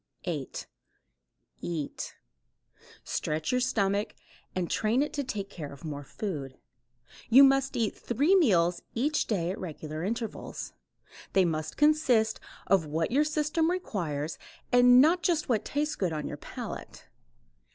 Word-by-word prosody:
8. 155 -7 -4 1.0
EAT. 160 -4 -4 0.9
Stretch 155 0 -2
your 250 0 +2
stomach 200 -3 0 0.4
and 180 -2 -1
train 225 +9 +1
it 300 - -5
to 285 - -1
take 210 -6 -4
care 160 -7 -8
of 140 +3 -11
more 145 -2 -5
food. 140 -5 -5 0.7
You 260 +4 +9
must 270 -1 +3
eat 225 -3 0
three 285 - +2
meals 180 - +3
each 290 +6 +1
day 180 -5 0
at 190 - -6
regular 155 -2 -6
intervals. 225 +3 -4 0.6
They 190 -1 +5
must 155 -2 -2
consist 280 -8 +3 0.3
of 185 -5 +3
what 160 +5 -1
your 285 +4 +4
system 305 +2 +1
requires 165 - -3 0.3
and 245 0 +7
not 335 +5 +4
just 325 -1 +1
what 220 -4 +2
tastes 300 +2 -1
good 180 -4 -1
on 150 -1 -3
your - - -6
palate. - - -8
215 Hz, 140 wpm, -29 LUFS, 165-275 Hz, 1.0 s, You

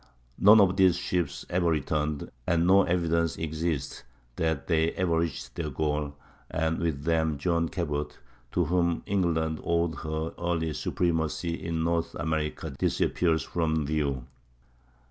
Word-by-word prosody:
None 105 +3 +8
of 95 -2 +4
these 95 -3 +5
ships 90 -4 -2
ever 85 -1 +1
returned, 75 -1 -1 0.2
and 85 -1 +2
no 95 +2 +6
evidence 85 -2 +1
exists 80 -3 -2 0.4
that 80 -3 0
they 80 -1 +2
ever 85 -3 +1
reached 75 -6 -3
their 80 -3 -3
goal; 75 0 -2 0.3
and 80 +1 0
with 80 -4 -1
them 80 -2 +1
John 85 +2 0
Cabot, 75 -4 -3 0.4
to 90 - +2
whom 85 +1 +1
England 80 -5 0
owed 85 -1 +1
her 80 +1 -3
early 80 -2 -1
supremacy 85 +1 -1
in 85 -1 -2
North 85 0 0
America, 75 -1 -2
disappears 80 +3 +1
from 80 -3 0
view. 70 -4 -1
80 Hz, 135 wpm, -28 LUFS, 75-85 Hz, 0.4 s, None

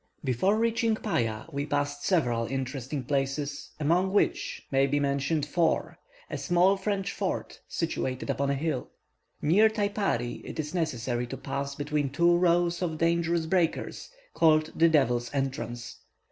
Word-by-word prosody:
Before 145 - +2
reaching 230 0 +2
Paya, 115 - -1
we 140 +1 -2
passed 145 -1 -1
several 120 -11 +1
interesting 135 +1 -3
places, 140 +2 -2
among 175 +5 +2
which 205 - 0
may 135 0 +3
be 145 +1 +1
mentioned 140 +2 0
Foar, 165 +2 0 0.3
a - - -5
small 180 +2 +3
French 195 -1 -2
fort, - - -3
situated 130 0 -2
upon 140 0 0
a 140 - +1
hill. 145 -2 -2 0.5
Near 205 +8 +5
Taipari 200 - -1
it - - -7
is 150 0 -3
necessary 125 -7 -1
to 135 - -6
pass 140 +2 -4
between 145 -1 -1
two 170 +5 +3
rows 175 0 +2
of 165 -3 -1
dangerous 170 0 +1
breakers, 170 -1 -1 0.2
called 155 -1 +4
the 165 0 +5
"Devil's 120 -6 +2
Entrance." 120 -3 -3
150 Hz, 145 wpm, -28 LUFS, 135-175 Hz, 0.5 s, Near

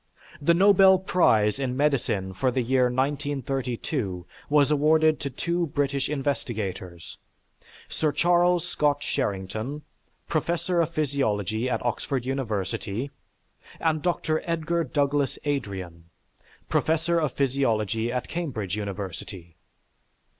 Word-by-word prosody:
The 170 +4 +4
Nobel 190 0 +6
prize 135 - +2
in 130 -2 -2
medicine 120 -10 0
for 130 +7 +1
the 125 0 0
year 130 +1 +3
1932 130 - -2 0.2
was 145 0 +4
awarded 155 +1 +4
to 140 - -3
two 170 +6 -1
British 140 -2 -1
investigators, 110 - -4 0.7
Sir 155 -2 0
Charles 175 +1 +3
Scott 145 -1 +1
Sherrington, 110 +5 -3 0.4
professor 170 +2 0
of 165 - 0
physiology 130 - 0
at 125 - -2
Oxford 120 +2 -1
University, 115 -1 -3 0.7
and 160 -2 +1
Dr. 160 -2 0
Edgar 170 0 0
Douglas 140 -1 0
Adrian, 95 - -4 0.6
professor 165 +2 +1
of 150 -6 -1
physiology 115 -5 0
at 125 0 -2
Cambridge 115 - -3
University. 95 -4 -6
135 Hz, 105 wpm, -26 LUFS, 110-155 Hz, 0.7 s, Nobel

